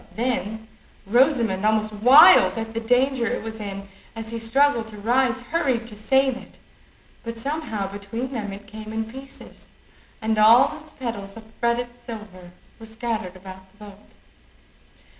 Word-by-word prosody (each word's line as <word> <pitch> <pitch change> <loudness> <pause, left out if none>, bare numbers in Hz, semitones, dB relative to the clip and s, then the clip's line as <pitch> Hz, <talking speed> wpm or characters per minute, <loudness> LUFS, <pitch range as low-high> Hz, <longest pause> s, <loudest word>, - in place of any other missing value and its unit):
Then 220 -2 -3 0.4
Rosamond, 235 -3 +2
almost 215 0 +1
wild 230 - +7
at 225 0 -5
the 230 - -2
danger 245 +1 +1
it - - -2
was 220 0 -7
in 200 -1 -6 0.3
as 225 0 -6
he 230 - -4
struggled 235 0 +2
to 215 -1 -10
rise, 250 +4 +1
hurried 255 -4 -1
to 225 -2 -10
save 265 +5 +2
it, - - -14 0.7
but 230 -1 -6
somehow 275 -5 -3
between 205 +6 -6
them 215 -6 -4
it 200 +1 -10
came 215 +1 -9
in 220 0 -2
pieces, 265 +4 -13 0.5
and 220 0 -1
all 225 +4 +6
its 310 0 -16
petals 225 -5 -6
of 225 - -10 0.2
fretted 240 +1 0
silver 210 -6 -10 0.3
were 225 - -11
scattered 220 -4 -4
about 190 0 -12
the 195 - -28
boat. 205 -2 -13
225 Hz, 155 wpm, -23 LUFS, 210-245 Hz, 0.7 s, wild